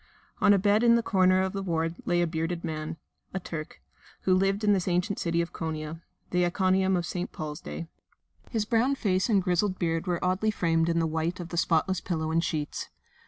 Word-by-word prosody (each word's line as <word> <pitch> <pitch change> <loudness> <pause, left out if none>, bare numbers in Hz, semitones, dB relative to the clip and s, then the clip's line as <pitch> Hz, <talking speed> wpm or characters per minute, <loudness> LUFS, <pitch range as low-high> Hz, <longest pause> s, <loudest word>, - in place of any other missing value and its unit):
On - - +5
a 200 - +6
bed 205 +2 +3
in 235 -1 +6
the 235 - +2
corner 185 -2 +3
of 190 - -2
the 195 - -2
ward 165 -3 -1
lay 175 0 +2
a - - +3
bearded 165 +1 -2
man 160 -1 -4 0.4
a - - 0
Turk 165 -4 -7 0.4
who 185 - +2
lived 195 +3 +2
in 205 -1 +5
this 190 -2 0
ancient 180 +3 0
city 170 0 +1
of 170 - -9
Konia 160 0 -4 0.3
(the 180 0 +2
Iconium 190 +1 +2
of 175 - -2
St. 180 +1 -4
Paul's 155 0 -6
day). 170 - -6 0.6
His 220 -3 -1
brown 240 +5 +2
face 190 -4 0
and 200 -4 +3
grizzled 185 +1 +1
beard 165 +1 -1
were 175 0 -1
oddly 185 +4 +1
framed 165 -5 +1
in 170 - +1
the 165 - +2
white 160 +3 -1
of 175 -1 -6
the 175 - -5
spotless 175 +2 +1
pillow 160 -3 -2
and 165 +1 +2
sheets. 150 -4 -3
180 Hz, 210 wpm, -28 LUFS, 165-190 Hz, 0.6 s, a